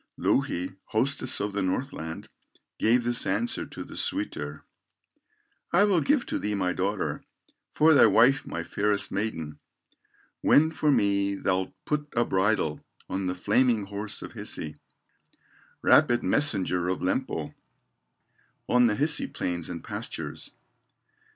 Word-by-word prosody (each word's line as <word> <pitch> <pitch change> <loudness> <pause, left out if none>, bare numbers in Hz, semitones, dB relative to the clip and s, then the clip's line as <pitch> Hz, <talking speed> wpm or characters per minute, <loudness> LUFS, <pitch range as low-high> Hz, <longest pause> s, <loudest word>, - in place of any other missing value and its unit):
Louhi, 90 +2 0
hostess 130 +3 0
of 105 0 -2
the 100 - -1
Northland, 95 - -3 0.5
Gave 120 +2 +3
this 120 0 0
answer 105 +5 -1
to - - -8
the - - -11
suitor: 75 0 -3 1.1
"I 175 +4 +5
will 195 -5 +3
give 285 -3 +2
to - - -3
thee 105 0 -2
my 90 -2 0
daughter, 100 +2 -2 0.5
For 160 +1 +4
thy 140 - +7
wife 135 +5 +4
my 85 - -4
fairest 105 +3 -1
maiden, 80 -8 -3 0.8
When 160 +2 +5
for 155 -1 0
me 100 -4 +2
thou'lt 95 -1 -1
put 150 -1 -1
a 120 0 +3
bridle 95 -6 0 0.3
On 95 0 -2
the 90 - -2
flaming 110 +3 +2
horse 100 +1 -3
of - - -9
Hisi, 75 -1 -4 1.1
Rapid 120 0 +4
messenger 95 -11 +2
of 95 - -2
Lempo, 90 - -2 1.1
On 125 -1 +4
the 105 - +1
Hisi 150 +6 +2
plains 85 -2 -3
and 85 -2 -6
pastures." - - -6
105 Hz, 130 wpm, -27 LUFS, 90-125 Hz, 1.1 s, thy